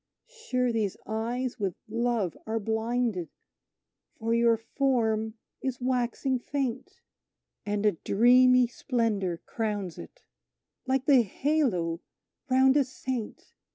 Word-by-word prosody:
Sure 260 Hz, -, -2 dB
these 215 Hz, -4 st, -1 dB
eyes 235 Hz, +3 st, -3 dB
with 195 Hz, -4 st, -1 dB
love 230 Hz, -5 st, -1 dB
are 225 Hz, +1 st, -1 dB
blinded, 220 Hz, -3 st, -1 dB, 0.9 s
for 225 Hz, 0 st, -1 dB
your 235 Hz, -1 st, +4 dB
form 225 Hz, -3 st, 0 dB, 0.3 s
is 260 Hz, -2 st, -3 dB
waxing 255 Hz, +1 st, 0 dB
faint; 275 Hz, -, -4 dB, 0.7 s
And 205 Hz, 0 st, -1 dB
a 210 Hz, -, +6 dB
dreamy 250 Hz, +7 st, +5 dB
splendour 225 Hz, -, -1 dB
crowns 205 Hz, -6 st, -3 dB
it, -, -, -12 dB, 0.6 s
like 265 Hz, 0 st, +1 dB
the 270 Hz, -4 st, +6 dB
halo 205 Hz, -, 0 dB, 0.5 s
round 265 Hz, +2 st, +5 dB
a 285 Hz, -, +5 dB
saint! 255 Hz, -3 st, -6 dB
235 Hz, 110 wpm, -28 LUFS, 220-260 Hz, 0.9 s, a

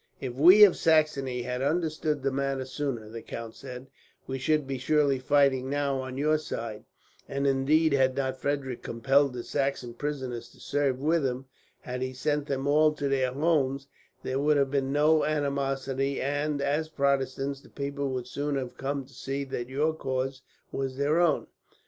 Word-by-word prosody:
"If 130 Hz, -3 st, -4 dB
we 180 Hz, +11 st, +8 dB
of 200 Hz, -, +7 dB
Saxony 140 Hz, -6 st, +2 dB
had 125 Hz, +1 st, -3 dB
understood 155 Hz, -1 st, 0 dB
the 135 Hz, -, +1 dB
matter 135 Hz, -1 st, -1 dB
sooner," 130 Hz, -5 st, -4 dB
the 115 Hz, +1 st, -8 dB
count 115 Hz, 0 st, -7 dB
said, 125 Hz, 0 st, -9 dB, 0.4 s
"we 135 Hz, 0 st, -4 dB
should 150 Hz, +2 st, +1 dB
be 135 Hz, -1 st, -4 dB
surely 140 Hz, 0 st, +2 dB
fighting 135 Hz, -1 st, +2 dB
now 140 Hz, -1 st, 0 dB
on 130 Hz, 0 st, -6 dB
your 155 Hz, +2 st, +2 dB
side; 115 Hz, -7 st, -6 dB, 0.4 s
and 140 Hz, 0 st, -1 dB
indeed, 140 Hz, +3 st, +3 dB
had 130 Hz, -1 st, +3 dB
not 130 Hz, -1 st, -1 dB
Frederick 140 Hz, -3 st, -2 dB
compelled 135 Hz, +3 st, +2 dB
his 120 Hz, -, -6 dB
Saxon 135 Hz, -4 st, -1 dB
prisoners 130 Hz, -3 st, -4 dB
to -, -, -20 dB
serve 140 Hz, -3 st, 0 dB
with 155 Hz, +3 st, +2 dB
him, 130 Hz, 0 st, -2 dB, 0.4 s
had 125 Hz, 0 st, -5 dB
he 130 Hz, 0 st, -2 dB
sent 145 Hz, +3 st, -1 dB
them 135 Hz, -1 st, -2 dB
all 150 Hz, +2 st, +4 dB
to 145 Hz, -2 st, -2 dB
their 130 Hz, -2 st, +1 dB
homes, 140 Hz, -2 st, +1 dB, 0.4 s
there 130 Hz, +1 st, -1 dB
would 150 Hz, +1 st, +3 dB
have 140 Hz, -1 st, +1 dB
been 135 Hz, -1 st, 0 dB
no 150 Hz, +2 st, +4 dB
animosity 140 Hz, -2 st, -1 dB
and, 145 Hz, +1 st, -1 dB
as 150 Hz, +3 st, 0 dB
Protestants, 140 Hz, -1 st, 0 dB
the -, -, -18 dB
people 140 Hz, 0 st, -3 dB
would 130 Hz, -2 st, -3 dB
soon 145 Hz, +3 st, -3 dB
have 130 Hz, -3 st, -4 dB
come 135 Hz, 0 st, -3 dB
to 135 Hz, -, -20 dB
see 135 Hz, +2 st, -4 dB
that 125 Hz, -2 st, -5 dB
your 150 Hz, +4 st, +1 dB
cause 130 Hz, -3 st, -3 dB, 0.3 s
was 135 Hz, -1 st, -3 dB
their 145 Hz, +4 st, +2 dB
own. 170 Hz, -4 st, +2 dB
140 Hz, 180 wpm, -28 LUFS, 130-145 Hz, 0.4 s, we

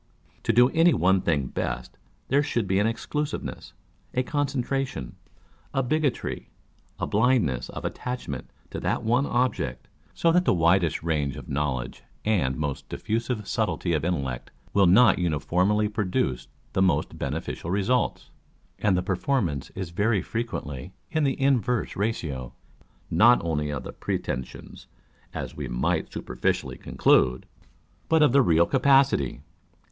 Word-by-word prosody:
To -, -, +3 dB
do 125 Hz, +3 st, +5 dB
any 165 Hz, +1 st, +4 dB
one 95 Hz, +1 st, +3 dB
thing 75 Hz, -5 st, +1 dB
best, 60 Hz, 0 st, -4 dB, 0.3 s
there 140 Hz, +3 st, +3 dB
should 120 Hz, -7 st, -1 dB
be 95 Hz, +1 st, +1 dB
an 105 Hz, -, +3 dB
exclusiveness, 150 Hz, +6 st, -4 dB, 0.4 s
a 125 Hz, -, +2 dB
concentration, 135 Hz, -, -2 dB, 0.6 s
a 135 Hz, -, +2 dB
bigotry, 145 Hz, 0 st, -1 dB, 0.5 s
a -, -, 0 dB
blindness 100 Hz, -, +1 dB
of -, -, -7 dB
attachment 125 Hz, -, -5 dB, 0.2 s
to -, -, -4 dB
that -, -, -1 dB
one 120 Hz, +5 st, +2 dB
object; 125 Hz, +1 st, -1 dB, 0.3 s
so 165 Hz, -, +3 dB
that 180 Hz, +2 st, +4 dB
the -, -, +3 dB
widest 85 Hz, -1 st, +2 dB
range 75 Hz, -4 st, 0 dB
of 70 Hz, -, -9 dB
knowledge 70 Hz, -3 st, -2 dB, 0.2 s
and 90 Hz, -12 st, +1 dB
most 75 Hz, -3 st, -4 dB
diffusive 115 Hz, -1 st, -2 dB
subtlety 105 Hz, -6 st, -1 dB
of 80 Hz, -, 0 dB
intellect 70 Hz, -8 st, -2 dB, 0.2 s
will 100 Hz, -2 st, +5 dB
not 110 Hz, +6 st, +6 dB
uniformly 90 Hz, +6 st, +1 dB
produce 90 Hz, -, -1 dB, 0.3 s
the 95 Hz, -, +1 dB
most 95 Hz, -2 st, +1 dB
beneficial 75 Hz, +3 st, -4 dB
results; 100 Hz, +7 st, 0 dB, 0.5 s
â€" -, -, -1 dB
and 95 Hz, -3 st, +4 dB
the 90 Hz, -, 0 dB
performance 95 Hz, -, -1 dB
is 95 Hz, -3 st, -5 dB
very 100 Hz, +1 st, +1 dB
frequently 95 Hz, -, -4 dB, 0.2 s
in 155 Hz, -2 st, +1 dB
the 135 Hz, -, 0 dB
inverse 125 Hz, -3 st, +1 dB
ratio, 80 Hz, -, -3 dB, 0.6 s
not 120 Hz, +2 st, +6 dB
only 75 Hz, -3 st, -1 dB
of 70 Hz, -3 st, -4 dB
the -, -, -7 dB
pretensions, 65 Hz, 0 st, -5 dB, 0.4 s
as -, -, -6 dB
we -, -, -4 dB
might -, -, -1 dB
superficially 60 Hz, 0 st, -2 dB
conclude, 65 Hz, 0 st, +2 dB, 0.6 s
but 160 Hz, -1 st, +5 dB
of 145 Hz, -, +5 dB
the 140 Hz, +2 st, +6 dB
real 85 Hz, -7 st, +4 dB
capacity. 135 Hz, -, +3 dB
95 Hz, 140 wpm, -26 LUFS, 75-125 Hz, 0.6 s, not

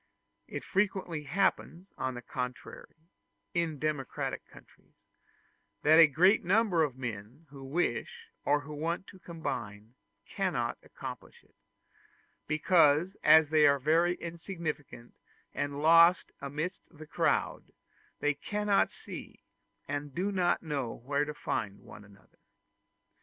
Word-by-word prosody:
It -, -, -6 dB
frequently 190 Hz, -6 st, -1 dB
happens, 185 Hz, +3 st, -1 dB
on 130 Hz, -1 st, -3 dB
the 120 Hz, -, -8 dB
contrary, 125 Hz, +1 st, -6 dB, 0.6 s
in 170 Hz, -3 st, -1 dB
democratic 145 Hz, -3 st, -3 dB
countries, -, -, -19 dB, 0.9 s
that 155 Hz, +2 st, +6 dB
a 165 Hz, -, +10 dB
great 180 Hz, +9 st, +4 dB
number 195 Hz, -2 st, +3 dB
of 140 Hz, -5 st, 0 dB
men 120 Hz, +4 st, -7 dB
who 135 Hz, -2 st, -11 dB
wish 135 Hz, -2 st, -3 dB
or 145 Hz, 0 st, +2 dB
who 145 Hz, +2 st, -9 dB
want 165 Hz, +5 st, -3 dB
to 190 Hz, -, -14 dB
combine 115 Hz, -, -6 dB, 0.3 s
cannot -, -, -2 dB
accomplish -, -, -10 dB
it, -, -, -30 dB, 0.9 s
because 155 Hz, +2 st, +3 dB
as 160 Hz, -1 st, +6 dB
they 155 Hz, -2 st, +6 dB
are 140 Hz, 0 st, +4 dB
very 165 Hz, +6 st, +2 dB
insignificant 165 Hz, -8 st, -6 dB, 0.4 s
and 145 Hz, +1 st, -3 dB
lost 170 Hz, +2 st, +6 dB
amidst 150 Hz, +7 st, -4 dB
the 155 Hz, -2 st, -12 dB
crowd, -, -, -1 dB, 0.5 s
they 145 Hz, 0 st, +2 dB
cannot 205 Hz, +7 st, +1 dB
see, -, -, -10 dB, 0.4 s
and 145 Hz, -1 st, -4 dB
know 195 Hz, +3 st, 0 dB
not 155 Hz, -10 st, -1 dB
where 140 Hz, +2 st, 0 dB
to 150 Hz, -, -5 dB
find, 100 Hz, -7 st, -3 dB
one 105 Hz, -, -13 dB
another. 100 Hz, -1 st, -21 dB
155 Hz, 120 wpm, -30 LUFS, 140-175 Hz, 0.9 s, a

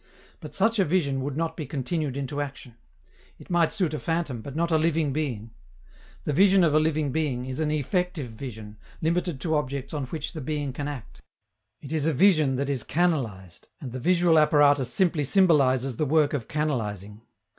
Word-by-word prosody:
But -, -, -10 dB
such 225 Hz, -1 st, +2 dB
a -, -, +5 dB
vision 145 Hz, -6 st, 0 dB
would 140 Hz, +1 st, -4 dB
not 165 Hz, 0 st, -2 dB
be 155 Hz, -5 st, -6 dB
continued 145 Hz, +1 st, -3 dB
into 140 Hz, +1 st, -3 dB
action; 135 Hz, -4 st, -7 dB, 0.6 s
it -, -, -13 dB
might 170 Hz, -2 st, +3 dB
suit 185 Hz, -7 st, -1 dB
a 155 Hz, -, -2 dB
phantom, 165 Hz, -8 st, -2 dB
but 140 Hz, +4 st, -8 dB
not 170 Hz, +1 st, 0 dB
a 160 Hz, -, +4 dB
living 160 Hz, -3 st, +1 dB
being. 120 Hz, -8 st, -3 dB, 0.7 s
The 150 Hz, -, -1 dB
vision 190 Hz, +3 st, +5 dB
of 155 Hz, -3 st, +3 dB
a 155 Hz, -, +5 dB
living 155 Hz, -2 st, 0 dB
being 130 Hz, -5 st, -1 dB
is 130 Hz, +2 st, -5 dB
an 155 Hz, -1 st, 0 dB
effective 155 Hz, -, -1 dB
vision, 110 Hz, -3 st, -9 dB, 0.2 s
limited 170 Hz, -2 st, -1 dB
to 160 Hz, -2 st, 0 dB
objects 140 Hz, -2 st, -3 dB
on 145 Hz, -3 st, -2 dB
which 155 Hz, +3 st, -5 dB
the 155 Hz, -, -6 dB
being 145 Hz, -1 st, -3 dB
can 145 Hz, +2 st, -4 dB
act: 140 Hz, -6 st, -8 dB, 0.6 s
it 140 Hz, -, -8 dB
is 155 Hz, -1 st, 0 dB
a 160 Hz, -, +2 dB
vision 155 Hz, -4 st, +4 dB
that 140 Hz, +2 st, -1 dB
is 140 Hz, -3 st, 0 dB
canalized, 120 Hz, -, -2 dB
and 130 Hz, -5 st, -7 dB
the 130 Hz, -, -5 dB
visual 170 Hz, +1 st, +4 dB
apparatus 145 Hz, -3 st, +4 dB
simply 175 Hz, -6 st, +2 dB
symbolizes 135 Hz, -, +3 dB
the 155 Hz, -, 0 dB
work 150 Hz, 0 st, +3 dB
of 130 Hz, -6 st, -3 dB
canalizing. 105 Hz, -9 st, -3 dB
150 Hz, 190 wpm, -26 LUFS, 130-160 Hz, 0.7 s, a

